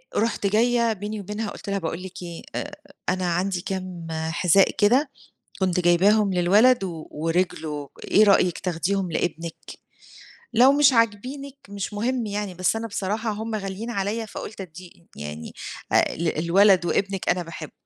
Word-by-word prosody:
رُحت 225 -2 0
جاية 230 +2 +2
بيني 210 +1 -5
وبينها 210 +2 -4
قُلت - - -9
لها: 200 0 0
"باقول 165 +1 -4
لِك 190 -1 -8
إيه، 170 -1 -7
أ 290 - -3 0.4
أنا 185 0 0
عندي 180 +1 -1
كام 185 -3 -5
حذاء 165 +4 +3
كده 255 +8 +3 0.5
كنت 185 -1 +1
جايباهم 195 +4 +4
للولد 205 +6 +4
و 165 -4 -6
ورجله 160 -2 -2 0.2
إيه 215 - +5
رأيِك 190 -4 +4
تاخديهم 180 +1 -1
لإبنك؟ 165 0 -2 1.0
لو 250 +4 +6
مش 285 -1 +5
عاجبينِك 255 +5 0
مش 200 0 -5
مهم 235 +3 -1
يعني، 205 -2 -3
بس 185 +4 +1
أنا 225 +1 -3
بصراحة 215 +2 -2
هُم 220 +2 -4
غاليين 205 +2 -4
عليَّ 215 +1 -2
فقلت 210 0 -8
أديه 180 -1 -9 0.3
يعني 75 +2 -7 0.4
أ - - +3
للولد 170 +4 +3
وإبنك 195 +1 -1
أنا 180 0 +2
باحبه". 160 -2 -8
195 Hz, 150 wpm, -24 LUFS, 175-220 Hz, 1.0 s, لو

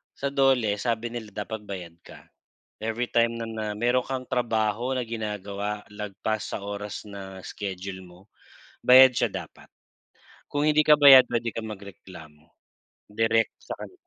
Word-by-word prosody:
sa 140 0 -3
DOLE, 130 -7 +2
sabi 115 -1 -2
nila 110 -4 -8
dapat 110 -1 -7
bayad 90 -4 -7
ka. - - -15 0.6
Every 115 +2 -2
time 115 0 +1
na 115 - -4
na 110 -1 -5
meron 120 +2 +2
kang 130 -1 -5
trabaho 120 +1 0
na 120 - -3
ginagawa 105 -2 -4
lagpas 105 +1 -3
sa - - -4
oras 100 +1 -6
na 95 -2 -9
schedule 95 -1 -6
mo, 90 0 -16 0.6
bayad 130 0 +8
siya - - +1
dapat. - - -9 0.8
Kung 145 +1 +1
hindi 150 0 +4
ka 150 -1 +5
bayad 135 -3 +10
puwede 120 0 0
kang 115 0 -5
magreklamo 90 -6 -13 0.7
direct 115 +1 +2
sa - - -6
kani - - -9
110 Hz, 150 wpm, -26 LUFS, 100-125 Hz, 0.8 s, bayad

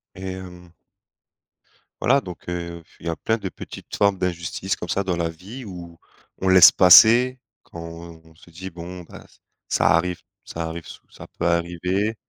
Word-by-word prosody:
Et 95 - -11
hem 90 -2 -8 1.3
voilà, 135 +4 +3
donc 90 -7 -11
heu, 85 -1 -5 0.2
il 85 - -9
y - - 0
a 80 - -2
plein 110 +6 -1
de 100 -4 -5
petites - - -10
formes 100 -2 +2
d'injustice 90 +1 -2
comme - - -7
ça 100 - 0
dans 95 -2 -1
la 85 -1 -1
vie 100 +11 -10
où 85 -4 -10 0.4
on 95 - -2
laisse 95 -1 +9
passer 120 +7 +7 0.2
quand 85 - -12
on 85 -1 -11
se 85 - -19
dit: 95 +3 -8
«Bon 90 +1 -9
bah, - - -13 0.4
ça - - +2
arrive 90 +2 -1 0.2
ça 85 - -6
arrive, 85 0 -7
so - - -11
ça - - -12
peut 85 - +1
arriver» 90 +5 -1
90 Hz, 175 wpm, -22 LUFS, 85-95 Hz, 1.3 s, laisse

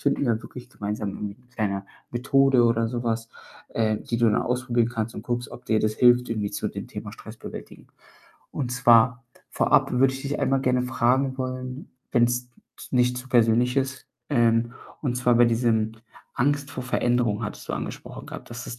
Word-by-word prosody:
finden 140 0 +1
wir 115 -2 +1
wirklich 125 -1 -11
gemeinsam 105 -1 -4
irgendwie 100 +1 -5
'ne 125 0 -27
kleine 100 -4 -2 0.3
Methode 135 +1 +4
oder 115 -1 +2
so 120 +1 -3
was, 115 -1 -2 0.4
äh, 110 -1 +1
die 120 - -3
du 120 - +4
dann - - +2
ausprobieren 125 -2 0
kannst 115 -1 -3
und - - -6
guckst, 120 -1 -3
ob 125 - -11
dir 110 -1 +2
das 110 0 0
hilft 125 +1 +5
irgendwie 105 -3 -2
zu - - -2
dem - - -7
Thema - - -7
Stressbewältigung - - -10 0.6
und 125 -4 -3
zwar 125 0 +4 0.3
vorab - - +3
würde 130 +1 +4
ich 135 - -7
dich 140 +1 -3
einmal 135 0 +2
gerne 125 -1 +2
fragen 130 +2 +1
wollen, 130 +1 -5 0.2
wenn's 120 0 +2 0.3
z - - -12
nicht 125 -1 +2
zu 130 - -10
persönlich 120 +1 +3
ist, 135 0 -1 0.2
ähm, 115 -2 +3 0.3
und 125 -4 -1
zwar 125 -1 +3
bei 120 - +7
diesem 115 -2 +1 0.4
Angst 145 +2 0
vor 130 - -5
Veränderung 120 -3 +1
hattest 105 - -7
du - - -2
angesprochen - - -7
gehabt, - - -9
dass 120 +1 -7
es 120 - -7
120 Hz, 185 wpm, -25 LUFS, 115-130 Hz, 0.6 s, bei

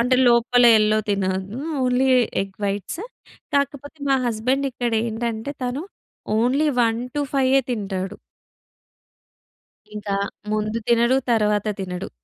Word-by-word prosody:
అంటే 250 +2 +3
లోపల 240 +1 +4
యెల్లో 215 0 +4
తినను. 195 +3 -1 0.2
Only 250 +1 +2 0.3
egg 195 -1 -9
whites. 200 - -3 0.5
కాకపోతే 285 +2 -1
మా 270 - +5
హస్బెండిక్కడేంటంటే, 235 -1 -1
తను 250 +4 -2 0.6
ఓన్లీ 270 +6 +2
1-5 260 +3 +1
తింటాడు. 195 -3 -3 1.8
ఇంకా 205 -1 -3 0.4
ముందు 215 +1 -1
తినడు. 235 +2 +4 0.2
తర్వాత 210 -2 +1
తినడు. 180 -1 -5
235 Hz, 95 wpm, -22 LUFS, 210-260 Hz, 1.8 s, మా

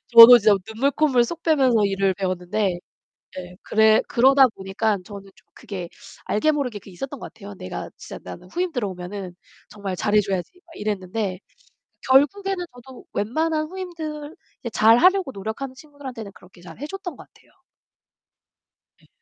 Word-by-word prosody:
저도 235 +1 +12
진짜 210 -1 +5
눈물 245 +6 0
콧물 270 -6 +3
쏙 335 +7 -6
빼면서 260 -9 +3
일을 195 -1 +1
배웠는데 185 0 -2 0.6
예, 180 0 -8
그래 220 0 +4
그러다 265 +2 +5
보니까 195 +2 -1
저는 200 -2 -10
좀 - - -25
그게 180 -4 -7 0.4
알게 260 +9 +2
모르게 255 -8 -2
그게 195 - -15
있었던 270 +9 -7
것 - - -9
같아요. 205 -2 -10
'내가 95 - -7
진짜 - - -9
나는 90 - -10
후임 360 0 -1
들어오면은 190 - -5 0.4
정말 200 -3 -5
잘해 210 +3 +2
줘야지.' 190 -3 -3
막 330 - -17
이랬는데 200 -2 -3 0.7
결국에는 360 +8 +3
저도 250 +1 -13
웬만한 310 +8 -1
후임들 320 -4 -7 0.3
이제 235 - -5
잘하려고 270 - +4
노력하는 220 +7 -6
친구들한테는 265 -7 -10
그렇게 180 -1 -18
잘해 265 +10 -8
줬던 385 +1 -7
것 - - -13
같아요. - - -26 1.5
네. - - -26
225 Hz, 345 characters per minute, -23 LUFS, 195-285 Hz, 1.5 s, 저도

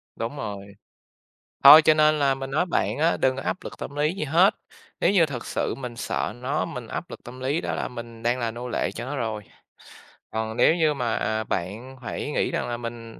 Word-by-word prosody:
Đúng 115 +6 -4
rồi. 100 -3 -6 0.9
Thôi 150 +3 +12
cho 155 - +5
nên 155 0 +3
là 140 -2 +3
mình 135 0 -6
nói 155 +6 +1
bạn 175 - 0
á, 165 +3 +2
đừng 130 0 +2
có 135 - -5
áp - - -2
lực - - -8
tâm 140 - -7
lý 150 +3 +1
gì 195 - -3
hết. 170 +7 +4 0.5
Nếu - - +4
như 185 -5 +5
thực 135 -5 -6
sự - - -2
mình 125 -3 -7
sợ 115 - -2
nó, 130 +3 -1
mình 125 -2 -7
áp 170 - -5
lực - - -10
tâm 125 +2 -10
lý 140 +6 -1
đó - - -3
là - - -2
mình 115 -2 -9
đang 120 +2 +1
là 115 -2 -1
nô 120 +2 -7
lệ - - -1
cho - - -6
nó 140 +3 -4
rồi. 110 -5 -3 0.9
Còn 110 0 -3
nếu 165 - +5
như 155 -3 +2
mà, 125 -4 -1
à, 110 0 -1
bạn 105 +9 -4
phải 145 - -4
nghĩ - - 0
rằng - - -2
là 120 - -2
mình 115 -1 -8
125 Hz, 230 wpm, -25 LUFS, 115-150 Hz, 0.9 s, Thôi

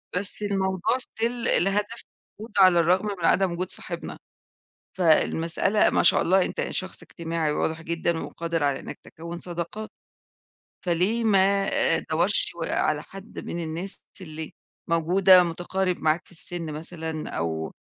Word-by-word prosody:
بس 200 +2 0
الموضوع 190 +2 0
Still 230 0 -1 0.3
لهدف 205 +4 -1 0.4
موجود 215 0 -10
على 185 -3 +6
الرغم 180 +5 +3
من 165 - -1
عدم 190 +1 +3
وجود 180 +2 -3
صاحبنا، - - -5 0.8
فالمسألة 165 +4 +3
ما - - +2
شاء - - +5
الله 190 +1 +3
أنت - - -3
شخص 185 0 -3
اجتماعي 165 -2 -3
واضح 160 +2 -2
جدًا، 170 0 -1
وقادر 165 -2 -3
على 140 -1 0
إنك - - -8
تكوِّن 170 +1 -9
صداقات، 175 +5 -5 1.0
فليه 185 +7 +1
ما 195 -1 +3 0.3
أدوَّرش 175 +6 +2
على 150 -2 0
حد 195 +5 -12
من 170 0 -4
الناس 170 +5 -5 0.2
اللي 160 -2 -7 0.4
موجودة، 180 +3 +5
مُتقارب 180 +2 -2
معاك 155 +2 +2
في - - -23
السن 165 -1 -3
مثلًا، 160 0 -5
أو 80 -1 -3
175 Hz, 135 wpm, -25 LUFS, 165-190 Hz, 1.0 s, على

